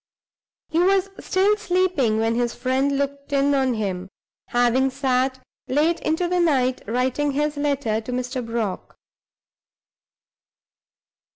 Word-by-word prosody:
He 325 Hz, -, 0 dB
was 385 Hz, +2 st, +3 dB
still 390 Hz, +3 st, +2 dB
sleeping 360 Hz, -, +1 dB
when 225 Hz, +1 st, +1 dB
his 240 Hz, 0 st, -1 dB
friend 270 Hz, +2 st, 0 dB
looked 280 Hz, 0 st, -3 dB
in 280 Hz, 0 st, +2 dB
on 265 Hz, -3 st, +1 dB
him, 190 Hz, -3 st, -3 dB, 0.4 s
having 245 Hz, +2 st, +2 dB
sat 260 Hz, -1 st, 0 dB, 0.3 s
late 310 Hz, +5 st, +2 dB
into 320 Hz, +3 st, 0 dB
the 360 Hz, +1 st, 0 dB
night 260 Hz, -7 st, +2 dB
writing 255 Hz, +5 st, 0 dB
his 295 Hz, +1 st, 0 dB
letter 280 Hz, -7 st, 0 dB
to 225 Hz, -, -7 dB
Mr. 250 Hz, +1 st, -3 dB
Brock. 230 Hz, -4 st, -4 dB
270 Hz, 120 wpm, -23 LUFS, 245-300 Hz, 0.4 s, was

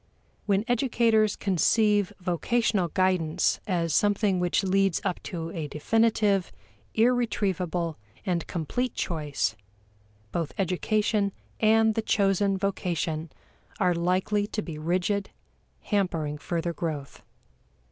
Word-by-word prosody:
When 200 Hz, +1 st, +2 dB
educators 230 Hz, -4 st, +2 dB
conceive 205 Hz, +2 st, +2 dB
vocational 185 Hz, +2 st, +1 dB
guidance 180 Hz, -2 st, +1 dB
as 170 Hz, -4 st, 0 dB
something 205 Hz, -1 st, +2 dB
which 180 Hz, +2 st, +1 dB
leads 195 Hz, -1 st, +2 dB
up 180 Hz, -, -1 dB
to 165 Hz, -2 st, -5 dB
a 160 Hz, -3 st, -4 dB
definitive, 205 Hz, +4 st, +1 dB, 0.4 s
irretrievable, 190 Hz, -8 st, +1 dB, 0.3 s
and 175 Hz, -3 st, -1 dB
complete 245 Hz, -, -2 dB
choice, 150 Hz, -9 st, -1 dB, 0.8 s
both 165 Hz, -3 st, -2 dB
education 200 Hz, +2 st, +1 dB, 0.3 s
and 220 Hz, 0 st, +4 dB
the 225 Hz, -, 0 dB
chosen 195 Hz, -2 st, +2 dB
vocation 170 Hz, -5 st, -2 dB, 0.5 s
are 180 Hz, -, +3 dB
likely 185 Hz, +4 st, 0 dB
to 215 Hz, 0 st, -3 dB
be 155 Hz, -3 st, -7 dB
rigid, 185 Hz, +5 st, 0 dB, 0.5 s
hampering 165 Hz, -8 st, -1 dB
further 170 Hz, +2 st, -2 dB
growth. 155 Hz, -5 st, -5 dB
190 Hz, 105 wpm, -27 LUFS, 170-210 Hz, 0.8 s, and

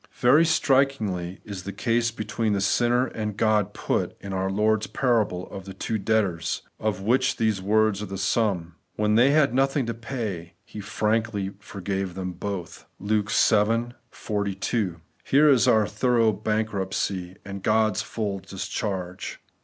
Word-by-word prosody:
Very 140 Hz, +7 st, +5 dB
strikingly 130 Hz, -, +1 dB
is 100 Hz, -3 st, -6 dB
the 100 Hz, -, -6 dB
case 115 Hz, +2 st, +1 dB
between 110 Hz, -1 st, -2 dB
the 100 Hz, -, +1 dB
sinner 120 Hz, +5 st, +2 dB
and 105 Hz, -4 st, -4 dB
God 105 Hz, -2 st, +2 dB
put -, -, -1 dB
in 100 Hz, -1 st, -6 dB
our 95 Hz, 0 st, -1 dB
Lord's 110 Hz, +2 st, +1 dB
parable 110 Hz, -8 st, 0 dB
of 95 Hz, -1 st, -8 dB
the 95 Hz, -, -9 dB
two 110 Hz, -, -2 dB
debtors, 95 Hz, -6 st, 0 dB, 0.2 s
of 105 Hz, -3 st, -1 dB
which 125 Hz, +6 st, +2 dB
these 110 Hz, -4 st, +1 dB
words 105 Hz, 0 st, +2 dB
are 105 Hz, -, -4 dB
the 95 Hz, +1 st, -5 dB
sum: 95 Hz, -4 st, 0 dB
' -, -, -46 dB
When 105 Hz, 0 st, +1 dB
they 120 Hz, +5 st, +5 dB
had 140 Hz, -4 st, +3 dB
nothing 135 Hz, 0 st, +2 dB
to 115 Hz, -, -2 dB
pay, 110 Hz, -8 st, -5 dB
he 105 Hz, -, -9 dB
frankly 105 Hz, -1 st, -1 dB
forgave 95 Hz, -2 st, -4 dB
them 95 Hz, -1 st, -3 dB
both 95 Hz, -1 st, -6 dB
' -, -, -44 dB
(Luke 105 Hz, 0 st, 0 dB
vii 115 Hz, +3 st, +3 dB, 0.2 s
42). 100 Hz, -3 st, -2 dB, 0.2 s
Here 145 Hz, +3 st, +4 dB
is 130 Hz, -2 st, +4 dB
our 110 Hz, -3 st, +5 dB
thorough 115 Hz, +1 st, +2 dB
bankruptcy, 100 Hz, -3 st, -2 dB
and 100 Hz, -1 st, -6 dB
God's 110 Hz, -1 st, +2 dB
full 100 Hz, -3 st, -3 dB
discharge. 95 Hz, -1 st, -4 dB
105 Hz, 155 wpm, -25 LUFS, 95-115 Hz, 0.2 s, Very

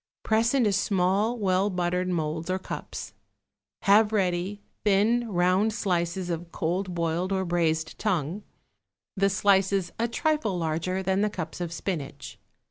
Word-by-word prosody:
Press 225 Hz, +3 st, +2 dB
into 225 Hz, -7 st, +3 dB
small, 200 Hz, +3 st, +1 dB
well 195 Hz, -1 st, +2 dB
buttered 180 Hz, 0 st, -1 dB
moulds 160 Hz, -1 st, -2 dB
or 185 Hz, -, +1 dB
cups. 190 Hz, -, -7 dB, 0.7 s
Have 210 Hz, +2 st, +5 dB
ready 190 Hz, -1 st, 0 dB, 0.2 s
thin, 220 Hz, +4 st, +3 dB
round 185 Hz, +4 st, +2 dB
slices 180 Hz, -3 st, -1 dB
of 170 Hz, 0 st, -5 dB
cold 180 Hz, +2 st, -2 dB
boiled 170 Hz, +2 st, -1 dB
or 190 Hz, -1 st, 0 dB
braised 160 Hz, -2 st, 0 dB
tongue, 180 Hz, -2 st, -1 dB, 0.7 s
the 195 Hz, 0 st, +3 dB
slices 195 Hz, -1 st, +2 dB
a 230 Hz, -, +2 dB
trifle 235 Hz, -, 0 dB
larger 170 Hz, +3 st, -1 dB
than 190 Hz, +1 st, +1 dB
the 210 Hz, -, +2 dB
cups 180 Hz, -3 st, -6 dB
of 170 Hz, -2 st, -3 dB
spinach. 150 Hz, -7 st, -5 dB
185 Hz, 135 wpm, -27 LUFS, 175-205 Hz, 0.7 s, Have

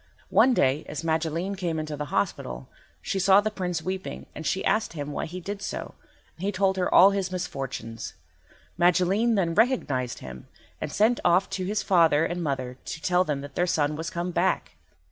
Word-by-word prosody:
One 255 Hz, -1 st, +5 dB
day 135 Hz, -1 st, +2 dB
as 150 Hz, +2 st, -5 dB
Magilene 165 Hz, +3 st, -1 dB
came 175 Hz, -4 st, -2 dB
into 155 Hz, -1 st, -3 dB
the 150 Hz, 0 st, -4 dB
hospital 65 Hz, -, -2 dB, 0.4 s
she 195 Hz, -, -1 dB
saw 195 Hz, +1 st, +6 dB
the 215 Hz, +1 st, 0 dB
Prince 180 Hz, -5 st, -3 dB
weeping, 185 Hz, 0 st, -4 dB
and 155 Hz, -, -5 dB
she 190 Hz, -, -1 dB
asked 215 Hz, -5 st, +1 dB
him 145 Hz, -2 st, -5 dB
why -, -, -3 dB
he 180 Hz, +3 st, -6 dB
did 200 Hz, +3 st, -6 dB
so, -, -, -5 dB, 0.4 s
and 170 Hz, -, -10 dB
he 200 Hz, -, +1 dB
told 190 Hz, 0 st, +1 dB
her 180 Hz, -, 0 dB
all 195 Hz, +2 st, +8 dB
his 195 Hz, -2 st, -2 dB
misfortunes. 135 Hz, -10 st, -5 dB, 0.6 s
Magilene 185 Hz, +6 st, +3 dB
then 175 Hz, -4 st, +1 dB
recognised 160 Hz, -, +1 dB
him, 65 Hz, -1 st, -10 dB, 0.3 s
and -, -, -3 dB
sent 225 Hz, +3 st, +3 dB
off 180 Hz, +2 st, +3 dB
to 185 Hz, -2 st, -2 dB
his 210 Hz, +2 st, -1 dB
father 165 Hz, -4 st, +4 dB
and 175 Hz, +1 st, -3 dB
mother 130 Hz, -4 st, -3 dB
to -, -, -6 dB
tell 180 Hz, +2 st, +2 dB
them 150 Hz, -5 st, -2 dB
that 140 Hz, 0 st, -9 dB
their 175 Hz, +4 st, +1 dB
son 150 Hz, -3 st, +1 dB
was 160 Hz, +1 st, -4 dB
come 175 Hz, +1 st, -3 dB
back. -, -, 0 dB
175 Hz, 195 wpm, -26 LUFS, 150-190 Hz, 0.6 s, all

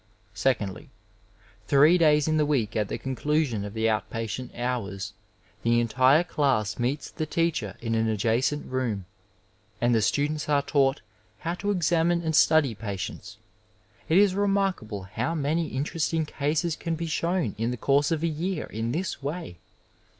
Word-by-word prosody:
Seoandlyy 105 Hz, -8 st, -1 dB, 0.8 s
three 150 Hz, +5 st, +6 dB
days 150 Hz, -2 st, +4 dB
in 155 Hz, 0 st, +2 dB
the 150 Hz, -, +3 dB
week 125 Hz, -8 st, 0 dB
at 105 Hz, -2 st, +1 dB
the -, -, -3 dB
conclusion 135 Hz, -4 st, -1 dB
of 105 Hz, +1 st, -7 dB
the 110 Hz, 0 st, +1 dB
out 110 Hz, -1 st, 0 dB
patient 115 Hz, +3 st, -4 dB
hours, 115 Hz, -6 st, -3 dB, 0.5 s
the 115 Hz, 0 st, +3 dB
entire 130 Hz, +6 st, +4 dB
class 130 Hz, -, 0 dB
meets 130 Hz, +5 st, -2 dB
the 155 Hz, -, -4 dB
teacher 160 Hz, -, -1 dB
in 115 Hz, -1 st, -2 dB
an 115 Hz, 0 st, +1 dB
adjacent 115 Hz, +7 st, 0 dB
room, 120 Hz, -7 st, -2 dB, 0.7 s
and 120 Hz, 0 st, +2 dB
the 115 Hz, -, +3 dB
students 150 Hz, +7 st, 0 dB
are 145 Hz, -1 st, +3 dB
taught 140 Hz, -1 st, +2 dB, 0.4 s
how 170 Hz, -, -2 dB
to 200 Hz, +3 st, -3 dB
examine 170 Hz, -2 st, +2 dB
and 160 Hz, -1 st, 0 dB
study 150 Hz, -5 st, +4 dB
patients. 100 Hz, -3 st, -6 dB, 0.7 s
It 165 Hz, -, +4 dB
is 200 Hz, -1 st, +5 dB
remarkable 195 Hz, -, 0 dB
how 130 Hz, -, -3 dB
many 155 Hz, +2 st, 0 dB
interesting 160 Hz, +3 st, -1 dB
cases 155 Hz, +3 st, -1 dB
can 165 Hz, -1 st, -3 dB
be 165 Hz, +1 st, -4 dB
shown 165 Hz, -, -1 dB
in 115 Hz, +1 st, 0 dB
the 125 Hz, -, -3 dB
course 140 Hz, +4 st, +2 dB
of 165 Hz, -1 st, -1 dB
a -, -, +2 dB
year 165 Hz, +2 st, -2 dB
in 115 Hz, +2 st, -3 dB
this 170 Hz, 0 st, -3 dB
way. 145 Hz, -, -5 dB
140 Hz, 160 wpm, -26 LUFS, 115-160 Hz, 0.8 s, three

